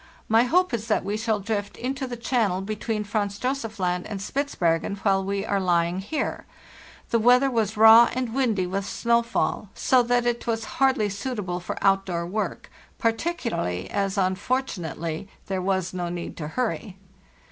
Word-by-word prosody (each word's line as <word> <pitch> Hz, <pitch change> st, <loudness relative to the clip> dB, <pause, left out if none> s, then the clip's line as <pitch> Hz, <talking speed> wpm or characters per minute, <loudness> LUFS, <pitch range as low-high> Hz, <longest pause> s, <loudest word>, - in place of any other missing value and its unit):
My 225 Hz, +2 st, +4 dB
hope 360 Hz, +4 st, +2 dB
is 225 Hz, -1 st, -2 dB
that 215 Hz, -, +1 dB
we 205 Hz, -, -1 dB
shall 220 Hz, -1 st, 0 dB
drift 205 Hz, 0 st, -3 dB
into 265 Hz, +1 st, -3 dB
the 245 Hz, -1 st, -5 dB
channel 225 Hz, -6 st, 0 dB
between 215 Hz, +1 st, -3 dB
Franz 205 Hz, -1 st, -2 dB
Josef 240 Hz, -3 st, -3 dB
Land 180 Hz, -1 st, -1 dB
and 205 Hz, -, -5 dB
Spitzbergen 200 Hz, -, -1 dB
while 195 Hz, -2 st, +3 dB
we 195 Hz, 0 st, -2 dB
are 200 Hz, -, 0 dB
lying 175 Hz, -1 st, +1 dB
here. 205 Hz, +11 st, -3 dB, 0.6 s
The 230 Hz, -, +3 dB
weather 250 Hz, +4 st, +5 dB
was 220 Hz, -3 st, 0 dB
raw 225 Hz, +2 st, +9 dB
and 250 Hz, -3 st, -2 dB
windy 230 Hz, -8 st, +1 dB
with 195 Hz, +2 st, -2 dB
snowfall, 235 Hz, -2 st, 0 dB
so 255 Hz, -1 st, +4 dB
that 245 Hz, 0 st, +1 dB
it 240 Hz, 0 st, -1 dB
was 225 Hz, -1 st, -1 dB, 0.2 s
hardly 260 Hz, -6 st, +3 dB
suitable 200 Hz, -4 st, -3 dB
for 175 Hz, -, -5 dB
outdoor 195 Hz, -3 st, +2 dB
work, 210 Hz, +5 st, -4 dB, 0.3 s
particularly 225 Hz, -, -1 dB
as, 195 Hz, 0 st, -1 dB
unfortunately, 185 Hz, -, -2 dB, 0.2 s
there 190 Hz, -1 st, -2 dB
was 190 Hz, -1 st, -1 dB
no 175 Hz, -1 st, -3 dB
need 175 Hz, 0 st, -5 dB
to 150 Hz, -, -4 dB
hurry. 220 Hz, 0 st, -3 dB
210 Hz, 160 wpm, -25 LUFS, 190-235 Hz, 0.6 s, raw